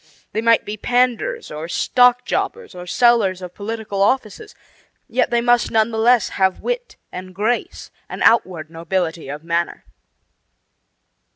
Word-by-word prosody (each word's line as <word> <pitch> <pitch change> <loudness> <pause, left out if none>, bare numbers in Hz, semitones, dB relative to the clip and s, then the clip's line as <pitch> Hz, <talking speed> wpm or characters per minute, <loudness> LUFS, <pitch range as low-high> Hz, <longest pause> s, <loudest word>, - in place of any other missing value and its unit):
They 220 - -2
might 230 0 +3
be 210 +1 -5
panders, 250 - 0
or 155 +2 -6
stock 245 +7 +3
jobbers, 470 - -3
or 180 0 -9
sellers 220 -4 +3
of 180 -1 -9
political 210 -1 -4
offices; 255 - -1 0.5
yet - - 0
they 235 0 +1
must 240 0 +3
none 220 0 +2
the 220 - -3
less 235 -1 +4
have 190 -1 0
wit - - -4
and 185 0 -9
grace 235 - -2 0.2
and - - -4
outward 180 -9 +2
nobility 165 -2 -3
of 145 +2 -7
manner. 170 +1 -2
215 Hz, 145 wpm, -20 LUFS, 180-240 Hz, 0.5 s, less